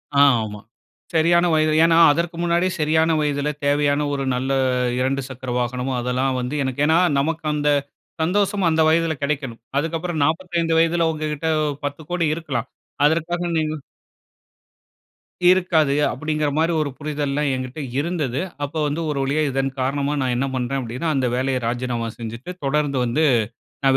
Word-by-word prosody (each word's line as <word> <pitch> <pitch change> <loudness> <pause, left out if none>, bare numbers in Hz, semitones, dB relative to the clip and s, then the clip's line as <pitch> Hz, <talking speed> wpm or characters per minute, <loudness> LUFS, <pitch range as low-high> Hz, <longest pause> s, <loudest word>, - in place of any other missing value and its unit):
ஆ, 140 - +4 0.2
ஆமா. 105 -1 -6 0.5
சரியான 170 +2 +4
வயது. 155 0 +3
ஏன்னா, 165 0 +4
அதற்கு 170 +2 -1
முன்னாடி 175 +1 +2
சரியான 160 +2 +2
வயதுல 145 0 0 0.2
தேவையான 145 0 +2
ஒரு 140 -1 -2
நல்ல 130 +2 -2 0.5
2 135 +2 0
சக்கர 130 -1 -7
வாகனமோ, 125 +2 -2
அதெல்லாம் 130 +1 0
வந்து 125 +4 -3
எனக்கு 130 +2 -1
ஏன்னா, 160 +2 +4 0.2
நமக்கு 160 +2 -2
அந்த 150 0 +1 0.5
சந்தோஷமும் 195 +1 +1
அந்த 160 0 +2
வயதுல 165 0 +2
கெடைக்கணும். 135 -6 -3 0.2
அதுக்கப்புறம், 165 +1 -2
45 165 0 0
வயதுல 165 0 +2
உங்ககிட்ட 155 0 -3 0.4
10 145 +2 -4
கோடி 175 -2 +1
இருக்கலாம். 135 -7 -4 0.4
அதற்காக 170 +3 0
நீங்க 155 0 0 1.8
இருக்காது. 170 -6 +2 0.2
அப்படிங்கிறமாரி 155 +1 0
ஒரு 145 - -1
புரிதல்லாம் 145 -1 -1
என்கிட்ட 130 +3 -5 0.2
இருந்தது. 150 -5 -1 0.2
அப்போ 145 +3 -4
வந்து, 150 +3 -2
ஒரு 145 - -2
வழியா 145 +3 0
இதன் 135 0 -1
காரணமா 140 +2 0
நான் 125 -1 0
என்ன 135 +2 0
பண்றேன் 130 +2 -1
அப்படின்னா, 125 +7 -4
அந்த 130 -2 +1
வேலைய 130 0 0
ராஜினாமா 120 -1 -2
செஞ்சுட்டு, 115 +7 -7
தொடர்ந்து 140 -1 0
வந்து 125 +7 +1 0.6
நான் 135 0 +5
150 Hz, 145 wpm, -22 LUFS, 135-165 Hz, 1.8 s, நான்